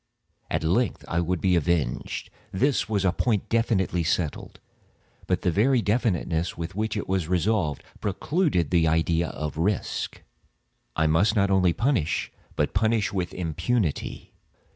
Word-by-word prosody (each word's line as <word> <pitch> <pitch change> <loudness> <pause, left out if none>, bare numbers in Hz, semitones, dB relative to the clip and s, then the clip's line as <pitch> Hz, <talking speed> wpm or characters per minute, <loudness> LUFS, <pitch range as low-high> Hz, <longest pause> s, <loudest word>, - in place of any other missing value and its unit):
At - - -1
length 95 +8 0
I 85 - 0
would 85 +1 0
be 95 -2 +3
avenged; 80 -6 -1 0.2
this 130 +3 +1
was 100 -3 0
a 90 - +4
point 105 +2 0
definitively 105 -6 +1
settled—but 80 -1 -4
the 90 - +2
very 125 +9 +3
definitiveness 90 -6 0
with 85 +2 -5
which 110 +2 -2
it - - -3
was 95 -4 0
resolved, 90 -4 0 0.2
precluded 105 - 0
the 85 -2 +4
idea 80 +1 +2
of 75 -1 -5
risk. 95 +5 -2 0.7
I 80 - +2
must 85 +8 +3
not 100 -2 +2
only 95 -2 +4
punish, 115 - 0 0.2
but - - 0
punish 110 0 +1
with 90 -3 -2
impunity. 85 - -2
90 Hz, 140 wpm, -26 LUFS, 85-110 Hz, 0.7 s, a